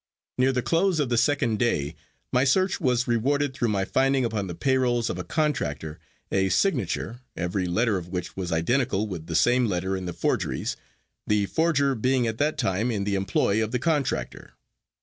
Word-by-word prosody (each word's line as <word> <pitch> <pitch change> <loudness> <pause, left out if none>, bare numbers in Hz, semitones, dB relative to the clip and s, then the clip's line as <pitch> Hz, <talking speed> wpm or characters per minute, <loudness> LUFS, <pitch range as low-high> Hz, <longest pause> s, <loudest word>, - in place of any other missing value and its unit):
Near 130 +1 +4
the 125 -2 -1
close 170 0 +2
of 140 -4 0
the 120 - +1
second 120 -7 +1
day 75 - 0 0.4
my 125 - +4
search 185 +8 +2
was 125 -3 +1
rewarded 135 +4 +1
through 120 -2 -1
my 100 -3 0
finding 135 +1 +2
upon 110 -4 -2
the 85 - -6
payrolls 120 +3 +1
of - - -5
a - - -3
contractor 80 - -2 0.3
a 95 0 +2
signature, 120 - 0 0.2
every 90 +2 -1
letter 105 +3 +1
of 85 - -10
which 90 -1 -5
was 90 -2 -4
identical 110 +6 +1
with 90 -6 -6
the 80 - -3
same 120 +7 +4
letter 95 0 -1
in 95 -1 -4
the 90 - -4
forgeries, - - -1 0.5
the 105 -1 +2
forger 145 +1 +1
being 125 +1 +1
at 110 -1 -3
that 150 +2 +1
time 100 +6 0
in 105 -4 -1
the 100 0 -1
employ 100 +2 +1
of 110 - -2
the 125 - 0
contractor. 145 +1 -2
115 Hz, 190 wpm, -25 LUFS, 95-135 Hz, 0.5 s, Near